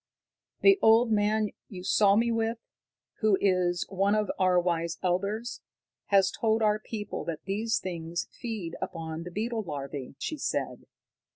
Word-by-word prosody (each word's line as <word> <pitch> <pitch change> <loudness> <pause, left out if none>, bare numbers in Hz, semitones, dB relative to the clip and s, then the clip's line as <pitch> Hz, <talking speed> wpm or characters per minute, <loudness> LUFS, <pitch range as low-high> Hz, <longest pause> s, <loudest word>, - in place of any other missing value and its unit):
"The 390 0 +6
old 225 +1 +5
man 210 0 +2 0.2
you 180 -4 -8
saw 200 +1 +4
with 230 0 +1
me, - - -54 0.6
who 215 -3 +3
is 180 -3 +1
one 195 +2 +1
of 210 -1 +1
our 185 -1 +4
wise 170 -1 -1
elders, 200 +6 -1 0.5
has 195 -1 +4
told 220 0 +1
our 210 0 +3
people 210 -1 -5
that 165 -2 -5
these 220 +4 0
things 170 -3 -4
feed 215 -9 -5
upon 165 -3 -4
the - - -5
beetle 225 +4 -2
larvae," 140 -6 -6
she 310 - -4
said. - - -3
200 Hz, 150 wpm, -28 LUFS, 175-220 Hz, 0.6 s, The